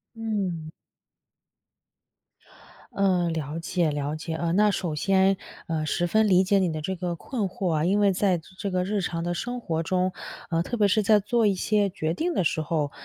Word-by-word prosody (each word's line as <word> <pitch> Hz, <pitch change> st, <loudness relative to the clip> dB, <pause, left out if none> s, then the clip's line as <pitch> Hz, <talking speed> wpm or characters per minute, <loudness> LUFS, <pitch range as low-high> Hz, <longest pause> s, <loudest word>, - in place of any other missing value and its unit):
嗯。 195 Hz, -8 st, -3 dB, 2.3 s
嗯。 185 Hz, -3 st, +2 dB
了 155 Hz, +1 st, -4 dB
解 170 Hz, -1 st, 0 dB
了 145 Hz, +1 st, -2 dB
解。 160 Hz, +1 st, -5 dB
呃， 170 Hz, +1 st, -1 dB
那 210 Hz, +1 st, +4 dB
首 170 Hz, -5 st, -2 dB
先， 195 Hz, +3 st, +3 dB, 0.3 s
呃， 160 Hz, -1 st, -1 dB
十 175 Hz, +3 st, 0 dB
分 215 Hz, +4 st, +3 dB
理 185 Hz, 0 st, +5 dB
解 195 Hz, +1 st, +3 dB
你 180 Hz, -3 st, +1 dB
的 155 Hz, -1 st, -4 dB
这 190 Hz, +4 st, -3 dB
个 175 Hz, -1 st, -3 dB
困 225 Hz, +5 st, -4 dB
惑 190 Hz, -2 st, -2 dB
啊。 155 Hz, +1 st, +1 dB
因 200 Hz, +3 st, +2 dB
为 200 Hz, -1 st, +4 dB
在 185 Hz, -2 st, +2 dB, 0.2 s
这 200 Hz, -, -3 dB
个 180 Hz, 0 st, +1 dB
日 200 Hz, +1 st, -1 dB
常 165 Hz, -2 st, -3 dB
的 175 Hz, 0 st, -1 dB
生 245 Hz, +6 st, -4 dB
活 165 Hz, -6 st, -2 dB
中 185 Hz, +1 st, 0 dB, 0.4 s
呃， 165 Hz, 0 st, +1 dB
特 240 Hz, -, -4 dB
别 205 Hz, -1 st, +4 dB
是 210 Hz, +2 st, +2 dB
在 210 Hz, +1 st, +5 dB
做 225 Hz, +2 st, +1 dB
一 200 Hz, -, +4 dB
些 205 Hz, +1 st, +1 dB
决 160 Hz, -2 st, -2 dB
定 340 Hz, -, -1 dB
的 185 Hz, -, +1 dB
时 160 Hz, 0 st, 0 dB
候， 155 Hz, -3 st, -1 dB
180 Hz, 210 characters per minute, -26 LUFS, 165-205 Hz, 2.3 s, 理